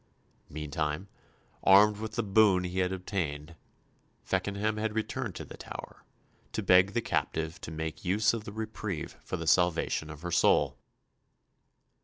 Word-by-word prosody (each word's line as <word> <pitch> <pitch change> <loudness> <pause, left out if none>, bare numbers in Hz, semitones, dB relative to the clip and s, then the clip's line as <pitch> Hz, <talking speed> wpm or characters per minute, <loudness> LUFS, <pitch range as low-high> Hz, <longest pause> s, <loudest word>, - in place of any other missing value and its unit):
Meantime, 75 +4 -3 0.5
armed 100 +2 +7
with 110 +1 -5
the 115 - -1
boon 100 -2 +4
he 90 +1 -3
had 90 0 +1
obtained, 85 -5 -3 0.7
Feckenham 100 +3 -1
had 110 0 -2
returned 110 -1 -2
to - - -6
the - - -11
Tower, - - -9 0.5
to 110 - -2
beg 95 +1 +5
the 120 -1 0
captive 80 +1 -2
to - - -6
make 80 0 -5
use 105 +5 +2
of 115 -2 -3
the 100 - -7
reprieve 110 -4 -5
for 90 - -4
the 85 - -5
salvation 85 -1 +2
of 75 +1 -10
her 90 - -3
soul. - - +3
95 Hz, 150 wpm, -30 LUFS, 80-105 Hz, 0.7 s, armed